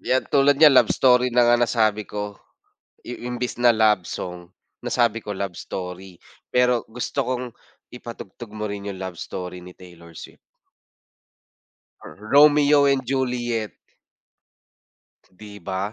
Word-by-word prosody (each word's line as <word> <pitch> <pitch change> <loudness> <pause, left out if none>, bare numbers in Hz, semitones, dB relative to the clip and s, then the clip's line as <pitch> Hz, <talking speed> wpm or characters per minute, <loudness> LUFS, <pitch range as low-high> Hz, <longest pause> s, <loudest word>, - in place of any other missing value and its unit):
'yan 130 0 0
tulad 140 0 +4
niyan 150 0 +7
Love 130 - +5
Story 125 -1 +3
na 120 0 +3
nga 120 0 +3
nasabi 110 -3 +1
ko. 105 0 -6 0.6
I 125 0 -7
imbes 125 0 -4
na 120 - +5
Love 105 -5 +2
Song, 90 -1 -7 0.3
nasabi 115 -2 0
ko 105 - -9
Love 95 -3 -5
Story 90 0 -7 0.3
pero 125 -1 +2
gusto 125 +4 -4
kong 125 -1 -2 0.5
ipatugtog 120 -2 -10
mo 105 - -4
rin 100 -1 -5
'yong 100 - -6
Love 95 -3 -6
Story 90 0 -7
ni 90 0 -13
Taylor 85 -2 -15
Swift. - - -11 1.7
Ro - - -10 0.2
Romeo 145 0 +6
and 135 -2 -1
Juliet. 120 -4 -2 1.6
'Di 100 +1 -13
ba. 95 +3 -4
115 Hz, 135 wpm, -22 LUFS, 95-125 Hz, 1.7 s, niyan